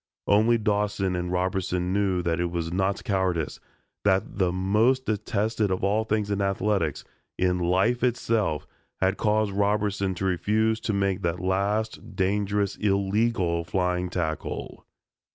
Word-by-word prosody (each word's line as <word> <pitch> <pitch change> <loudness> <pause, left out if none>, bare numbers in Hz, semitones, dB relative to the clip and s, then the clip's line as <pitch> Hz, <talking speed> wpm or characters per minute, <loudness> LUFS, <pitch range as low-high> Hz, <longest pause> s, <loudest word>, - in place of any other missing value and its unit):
Only 110 +3 +4
Dawson 105 -3 0
and 90 0 -2
Robertson 90 0 -1
knew 95 -3 +1
that 85 0 0
it 85 0 0
was 85 -1 -3
not 95 +1 0
cowardice, 95 -6 -1 0.4
that 95 -1 +3
most 100 +8 +1
detested 110 0 0
of 95 - -2
all 105 +3 +2
things 105 -1 -1
in 100 0 0
athletics, 100 -5 0 0.3
in 90 0 +1
life 95 +8 +1
itself, 115 - 0 0.3
had 95 0 +1
caused 105 -1 +1
Robertson 100 -1 0
to 95 - -3
refuse 110 +4 +1
to 110 - -2
make 100 -1 0
that 85 +1 -1
last 100 +4 -1
dangerous, 100 +1 0
illegal 100 -3 +1
flying 90 0 -1
tackle. 80 -3 -4
100 Hz, 135 wpm, -26 LUFS, 90-105 Hz, 0.4 s, Only